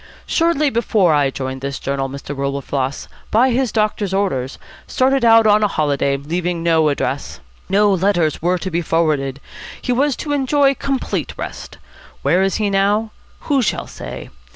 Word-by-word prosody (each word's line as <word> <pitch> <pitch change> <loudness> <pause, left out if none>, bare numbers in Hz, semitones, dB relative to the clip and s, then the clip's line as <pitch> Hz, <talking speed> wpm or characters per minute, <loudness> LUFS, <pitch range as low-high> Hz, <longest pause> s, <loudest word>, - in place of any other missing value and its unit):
Shortly 325 -4 +1
before 215 -7 +2
I 145 -2 +3
joined 130 0 -5
this 140 0 -4
journal, 135 0 -2
Mr. 140 +1 -7
Wilberfloss, 140 0 -3 0.2
by 250 +4 +3
his 250 0 0
doctor's 210 -3 0
orders, 135 -10 -1 0.3
started 265 0 +1
out 225 -1 +6
on 210 0 +5
a 210 - +3
holiday, 140 -5 0
leaving 170 +4 -3
no 160 -2 +3
address. 140 -1 -3 0.3
No 205 +1 +4
letters 175 -4 +1
were 180 +2 +1
to 185 +1 -5
be 170 +1 0
forwarded. 150 -5 0 0.4
He - - -3
was 270 +2 +2
to 290 - -4
enjoy 280 0 +3
complete 270 0 -3
rest. - - -7 0.5
Where 180 - +3
is 195 0 +1
he 210 -2 0
now? 205 +3 +1 0.3
Who 280 -3 +1
shall 230 - -1
say? - - -9
190 Hz, 160 wpm, -19 LUFS, 140-225 Hz, 0.5 s, out